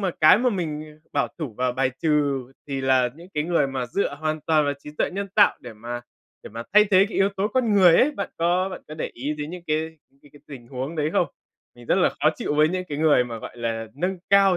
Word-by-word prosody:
mà 190 -3 0
cái 155 +5 +7
mà 250 +1 +2
mình, 155 -7 -3
à, 155 -1 -14 0.2
bảo 140 - +1
thủ 145 -9 -5
và 125 0 +1
bài 130 +1 0
trừ 145 -4 +1 0.2
thì 135 -1 -2
là 130 -2 +3
những 170 +3 -13
cái 150 0 0
người 170 -4 +2
mà 130 -2 -3
dựa 145 +3 -1
hoàn 155 +1 -2
toàn 155 0 +2
vào 145 - 0
trí 150 - -10
tuệ - - +1
nhân 200 +2 -4
tạo 205 - +5
để 120 - -9
mà 120 +3 -6 0.4
để - - -10
mà 115 +2 -6
thay 210 +1 +7
thế 195 -1 +4
cái - - -6
yếu 195 +1 +4
tố 195 +2 0
con 235 -1 +1
người 180 -4 +7
ấy. 285 - +4
Bạn 200 -9 -5
có 175 +3 +2
bạn 190 - -8
có 155 - -7
để 155 - -4
ý 140 +5 -3
đến 150 0 -6
những 180 0 -8
cái 160 +1 -2 0.2
cái 145 - -19
cái 145 - -17
tình 125 -5 -11
huống 135 +5 -5
đấy 150 0 0
không? - - +2 0.5
Mình 120 -1 -15
rất - - +3
là - - +4
khó - - +4
chịu - - -2
với 155 +1 +4
những 185 +2 -2
cái 145 - -4
người 150 -5 +4
mà, 115 -2 -6
gọi 110 - -9
là, 115 -1 -3
nâng 180 +6 -2
cao 195 -2 +5
155 Hz, 270 wpm, -24 LUFS, 135-185 Hz, 0.5 s, cái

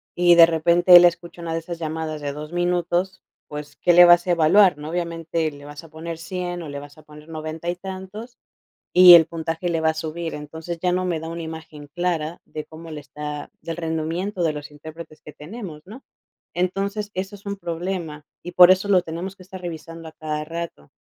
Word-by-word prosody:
y 175 0 +5
de 170 -1 +9
repente 170 +2 +5
él 175 0 +10
escucha 170 0 -1
una 165 -1 -3
de 165 - -1
esas 170 +1 -7
llamadas 160 -1 -4
de 145 -1 -3
2 150 +2 -8
minutos, 175 +1 -1 0.3
pues, 150 0 -8
¿qué 175 - +3
le 175 +1 +9
vas 175 0 +6
a 180 - 0
evaluar?, 175 +2 +5
¿no?, 150 +1 -7
obviamente 165 -2 -2
le 145 0 -13
vas 145 +2 -10
a 165 - -14
poner 160 +1 -7
100 175 0 -5
o 155 - -8
le 140 0 -6
vas 145 +1 -13
a 155 - -16
poner 150 +1 -15
90 155 +1 -5
y 175 - -1
tantos, 190 +6 -9 0.6
y 180 -1 +10
el 165 -2 +8
puntaje 165 +1 -4
le 165 -1 0
va 160 - +3
a - - -4
subir. 160 +1 -5
Entonces, 160 +3 -7
ya 180 0 +1
no 185 +1 0
me 170 -3 -1
da 160 - -7
una 170 0 -5
imagen 160 -2 -9
clara 175 -2 -2
de 155 - -7
cómo 160 +1 -12
le 155 -1 -6
está 150 +1 -7
del 165 -1 -6
rendimiento 170 +4 -3
de 160 -2 +2
los 150 0 -8
intérpretes 155 +2 -11
que 150 - -11
tenemos, 165 -1 -9
¿no? 225 +8 -12 0.5
Entonces, 200 +4 -2
eso 195 +2 -4
es 200 - -21
un 200 0 -3
problema, 170 -4 -5 0.2
y 175 - -8
por 180 0 +8
eso 190 +2 +3
lo 190 -3 +4
tenemos 175 +3 -6
que 185 - -15
estar 185 0 -10
revisando 165 -1 -8
a - - -12
cada 155 -1 -4
rato, 165 - -7
165 Hz, 215 wpm, -22 LUFS, 155-180 Hz, 0.6 s, él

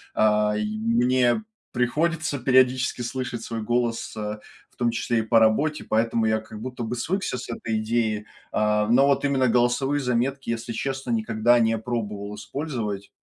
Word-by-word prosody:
а, 105 0 +3
и 105 - -1
мне 120 - +2 0.3
приходится 150 +4 0
периодически 130 0 +3
слышать 120 -1 -4
свой 115 -1 -4
голос, 120 +1 -1
э, 105 0 -4 0.3
в - - -32
том 120 -1 +1
числе 115 0 0
и - - +2
по 115 +1 +4
работе, 140 +8 +2
поэтому 115 +1 +1
я 110 0 +1
как 110 -1 -10
будто 125 0 -5
бы 115 +2 -3
свыкся 185 +2 -2
с 125 - -7
этой 115 -1 -2
идеей. 110 -1 -1 0.3
А, 105 0 +1
но 135 +4 +5
вот 140 0 +2
именно 135 -2 +2
голосовые 125 +4 +2
заметки, 130 +2 -1
если 115 0 -3
честно, 135 0 -3
никогда 115 +1 +3
не 115 -1 +2
пробовал 105 -3 -4
использовать. 110 -5 -4
120 Hz, 165 wpm, -24 LUFS, 110-130 Hz, 0.3 s, но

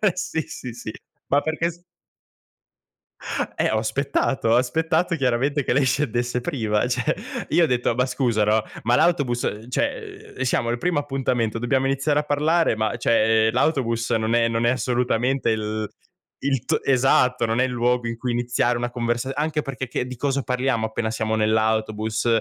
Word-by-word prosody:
eh, 210 -4 +3
sì, 180 -2 -2
sì, 125 - -8
sì. 115 -1 -7 0.4
Ma 140 - +3
perché 160 +2 -1
s 175 +1 -16 1.7
Eh, - - +2
ho 110 - +1
aspettato, 130 +2 0
ho 115 - +5
aspettato 160 +7 +1
chiaramente 135 +1 +1
che 120 - 0
lei 140 0 +3
scendesse 125 -2 0
prima; 115 -8 0
cioè, 125 +5 0 0.3
io 175 - +4
ho 160 - +4
detto: 125 -1 +1
"Ma 125 - +2
scusa, 125 -4 0
no, 105 +1 +2 0.2
ma 120 +2 +3
l'autobus 140 -8 +2
uhm, 110 +3 -4
cioè, - - -3
uhm, - - -6
siamo 120 -2 0
al 120 - 0
primo 175 +3 0
appuntamento, 125 -5 -1
dobbiamo 130 +2 +1
iniziare 140 +2 +1
a 150 - -1
parlare, 150 0 +2
ma 110 -1 -1
cioè, 110 -1 +3
l'autobus 120 -3 0
non 110 +1 +1
è 115 -1 +3
non 115 0 0
è - - +4
assolutamente 125 0 0
il 110 -1 -2 0.5
il 135 -3 0
t" - - +1
esatto, 125 -2 +3
non 115 +2 0
è 130 - +4
il - - -2
luogo 120 0 +1
in 115 0 -4
cui 125 +1 -2
iniziare 120 0 0
una 120 0 -2
conversa 120 +1 -2
anche 150 +1 0
perché 135 -2 -5
che 125 +1 -3
di 130 - -6
cosa 140 +2 -1
parliamo 125 -3 0
appena 110 0 -3
siamo 110 0 -1
nell'autobus. 110 0 0
125 Hz, 180 wpm, -23 LUFS, 115-135 Hz, 1.7 s, ho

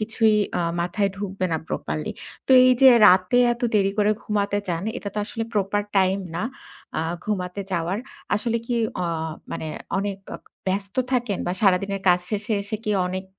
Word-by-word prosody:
কিছুই 220 0 +2 0.2
আ - - 0 0.2
মাথায় 195 +3 0
ঢুকবে 195 -2 -3
না 160 - +1
প্রপারলি। 75 +1 -3 0.3
তো - - -4
এইযে 255 +1 +6 0.2
রাতে 185 +6 +5
এত 240 - -8
দেরি 195 -1 +3
করে 210 0 +4
ঘুমাতে 205 -1 0
যান 170 0 -1 0.2
এটাতো 205 +1 -5
আসলে 225 +1 -4
প্রপার 205 +1 +1
টাইম 190 0 +3 0.2
না। 175 - -2 0.6
আ - - +1 0.2
ঘুমাতে 190 -2 -3
যাওয়ার। 175 +3 -1 0.4
আসলে 230 +2 0
কি 240 - -1 0.3
অ - - -1 0.5
মানে 160 - -4 0.3
অনেক 200 -1 -2 0.2
অক - - -22 0.2
ব্যস্ত 195 +1 -2 0.2
থাকেন 240 -6 0
বা 175 - 0
সারাদিনের 195 0 +2
কাজ 180 0 +6
শেষে 210 +1 -2
এসে 215 +2 -3
কি 210 - -1 0.2
অনেক 185 +1 -4
200 Hz, 165 wpm, -23 LUFS, 185-215 Hz, 0.6 s, এইযে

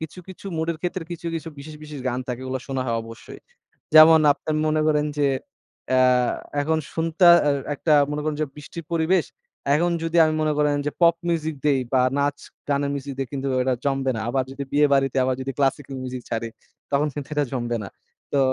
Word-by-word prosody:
কিছু, 160 +2 -7
কিছু 190 +1 -10
mood 160 +1 -2
এর 155 - -10
ক্ষেত্রে 180 0 -2
কিছু, 170 0 -7
কিছু 165 0 -4
বিশেষ, 155 +2 -9
বিশেষ 150 -2 -8
গান 125 0 -2
থাকে 125 0 -3
ওগুলা 130 0 -3
শোনা 135 -1 -1
হয় 115 -1 0
অবশ্যই। 115 0 -11 0.5
যেমন 155 0 +9
আপনি 150 - -7 0.2
মনে 155 0 +1
করেন 150 -1 +2
যে, 145 - +3 0.6
অ্যা 130 0 +4 0.6
এখন 160 +2 +1
শুনতা 165 +2 +3 0.2
অ্যা 145 - +3 0.2
একটা 155 +2 0 0.2
মনে 150 0 -3
করেন 155 -1 -1
যে - - 0
বৃষ্টির 150 +2 -9
পরিবেশ, 165 +2 +2 0.5
এখন 175 +3 +2
যদি 165 +1 -1
আমি 155 0 +1
মনে 155 - +1
করেন 150 -1 +2
যে 150 - +1
pop 170 0 +6
music 160 -2 -1
দেই 140 -3 +3
বা 130 - +4 0.2
নাচ-গানের 140 0 -2
music 140 0 -6
দেই 135 - -1
কিন্তু 140 -1 -3
ব্যাপারটা 130 0 +1
জমবে 135 -1 0
না। 110 - -3
আবার 130 +2 0
যদি 140 +1 -5
বিয়ে 150 +1 +5
বাড়িতে 135 -1 +1
আবার 130 0 +1
যদি 135 +1 -3
classical 140 0 0
music 125 -1 -5
ছাড়ি 115 0 -2 0.4
তখন 140 +2 +2
কিন্তু 145 -1 -6
এটা 145 - +2
জমবে 120 -2 -2
না। 100 - -6 0.4
তো 140 - +2
145 Hz, 200 wpm, -23 LUFS, 135-155 Hz, 0.6 s, যেমন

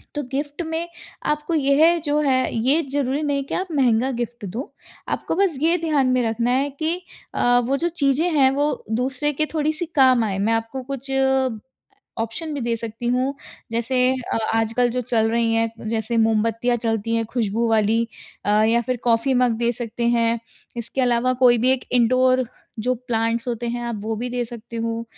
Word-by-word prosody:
तो 295 - -2
गिफ़्ट 290 +4 -3
में 325 +1 -3 0.4
आपको 300 +2 -1
यह 305 +4 +4
जो 295 0 +1
है, 260 -3 +1
ये 260 +8 +3
ज़रूरी 280 0 0
नहीं 285 -2 0
कि - - -7
आप 375 - -2
महँगा 260 -3 +2
गिफ़्ट 240 -3 -4
दो। 225 +9 -6 0.4
आपको - - -2
बस 375 -5 +1
ये 335 +3 +3
ध्यान 305 -5 +1
में 255 0 +2
रखना 235 +2 0
है 270 +3 +1
कि 320 +2 0 0.4
अ, 245 0 +4
वो 255 +3 0
जो 340 +4 0
चीज़ें 310 0 +1
हैं 270 -3 +5
वो 290 +2 -1
दूसरे 260 +5 0
के 310 +2 0
थोड़ी-सी 310 +2 0
काम 260 -4 +5
आएँ। 195 -3 -2
मैं 215 +3 +2
आपको 225 +4 -3
कुछ 275 0 -5 1.1
ऑप्शन 230 +8 -3
भी 285 - -3
दे 235 -1 0
सकती 230 +1 -6
हूँ। 260 +3 0 0.4
जैसे 235 +3 -1 0.4
अ - - +1 0.2
आजकल 225 +2 +2
जो 250 +2 -1
चल 225 -2 +1
रही 230 0 +1
है, 225 0 +2 0.2
जैसे 225 +1 -1
मोमबत्तियाँ 225 +2 +2
चलती 225 -1 -1
हैं 230 0 +1
खुशबू 230 0 -1
वाली 220 +1 +3 0.4
अ, - - +2
या 230 +2 +3
फिर 250 +2 -2
कॉफ़ी 235 +3 +2
मग 245 -2 +2
दे 235 0 +1
सकते 235 0 -4
हैं। 230 0 +2 0.4
इसके 235 +3 -3
अलावा 245 0 +2
कोई 240 -1 +6
भी 250 +3 +3
एक 260 - -2
इंडोर 255 +1 +3 0.3
जो 250 +3 +1
प्लांट्स 230 0 0
होते 240 0 -3
हैं 240 +1 -3
आप 235 -2 -3
वो 220 +1 -2
भी 245 +3 -3
दे 245 0 -1
सकते 235 0 -9
हो। 230 0 -2
245 Hz, 190 wpm, -22 LUFS, 230-275 Hz, 1.1 s, कोई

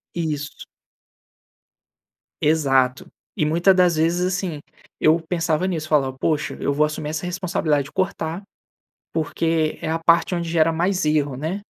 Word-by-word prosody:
Isso. 150 -4 -4 1.8
Exato. 135 -5 +2 0.3
E 155 - +1
muita 170 +5 +4
das 180 -2 +3
vezes 170 +3 +1
assim, 180 -5 -3 0.4
eu 160 +2 +4
pensava 170 0 0
nisso, 160 -4 -3
falava: 135 -4 +2
"Poxa, 155 +2 -1
eu 140 - 0
vou 150 +2 +3
assumir 150 0 -4
essa 155 +2 -4
responsabilidade 175 -5 -1
de 145 - -12
cortar 185 -1 -2 0.7
porque 160 0 0
é - - -4
a 160 +1 0
parte 170 +2 +3
onde 170 -1 -2
gera 165 -1 +3
mais 180 +3 0
erro, 150 -3 +1
né? 160 +9 -3
160 Hz, 145 wpm, -22 LUFS, 150-175 Hz, 1.8 s, muita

